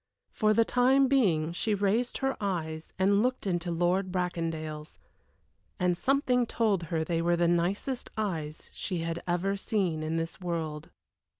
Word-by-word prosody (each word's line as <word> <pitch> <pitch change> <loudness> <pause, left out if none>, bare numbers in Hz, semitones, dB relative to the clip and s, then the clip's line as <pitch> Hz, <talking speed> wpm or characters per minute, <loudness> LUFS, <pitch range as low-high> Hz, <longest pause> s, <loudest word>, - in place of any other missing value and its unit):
For 215 -1 +2
the 230 - +4
time 260 +3 +4
being 175 - +2
she 210 +4 0
raised 205 +5 +1
her 270 0 0
eyes 160 -5 -3
and 200 +2 +3
looked 255 0 0
into 175 -2 -1
Lord 175 +3 +1
Bracondale's, 165 -4 -3 0.8
and 180 -1 +2
something 250 +2 +2
told 215 -6 +1
her 160 0 -1
they 165 +1 -1
were 175 +1 +2
the 170 0 +2
nicest 185 +9 0
eyes 165 -8 -3
she 180 -4 -3
had 165 +1 -3
ever 180 +3 0
seen 195 -6 -1
in 155 +1 -1
this 165 +3 -4
world. 160 -4 -3
180 Hz, 155 wpm, -29 LUFS, 165-215 Hz, 0.8 s, the